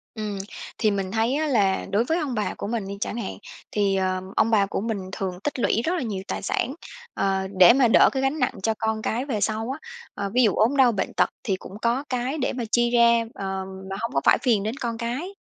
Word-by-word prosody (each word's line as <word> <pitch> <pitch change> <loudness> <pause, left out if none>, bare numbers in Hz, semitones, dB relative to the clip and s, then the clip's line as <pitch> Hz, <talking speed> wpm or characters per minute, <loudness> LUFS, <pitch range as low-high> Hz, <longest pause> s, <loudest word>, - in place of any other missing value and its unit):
Ừm, 210 -2 -4 0.4
thì 215 - +2
mình 195 -2 -2
thấy 230 +4 +1
á 310 +1 0
là 205 -8 +2
đối 210 +4 +3
với 325 +7 0
ông 295 -7 -2
bà 215 - -1
của - - -6
mình 220 -4 -2
đi 200 - -6
chẳng 225 - -2
hạn, 220 - -4 0.3
thì, 200 -2 +1
ờ, 185 -1 0
ông 225 - +3
bà 200 -2 +4
của 195 - -3
mình 225 -1 -2
thường 185 -2 -4
tích 275 -3 -2
lũy 230 - +2
rất 345 - +1
là 345 - -1
nhiều 205 -6 -3
tài - - -3
sản, 260 - -1 0.4
ờ, 195 -1 0
để 185 +5 +9
mà 260 -2 +4
đỡ - - +6
cái 265 - -1
gánh 270 +3 0
nặng 250 - +1
cho 225 - +2
con 220 0 -1
cái 245 +5 -1
về 220 -7 -2
sau 220 +3 -1
á. 280 - -5 0.3
Ờ, 200 0 -3
ví 250 - +4
dụ 215 - +3
ốm 250 +6 +2
đau 255 -3 +6
bệnh 195 -4 -2
tật - - +2
thì 200 -6 0
cũng 190 +2 -10
có 240 +4 +1
cái 255 +4 -1
để 260 - -1
mà 250 -2 -3
chi 240 0 +3
ra, 235 -1 +5
ờ, 190 -5 -4 0.2
mà 195 - -3
hông 230 - -2
có 135 - +1
phải - - +6
phiền 220 -6 +2
đến 220 +4 -2
con 235 -4 -3
cái. 250 +12 -4
225 Hz, 255 wpm, -24 LUFS, 200-250 Hz, 0.4 s, để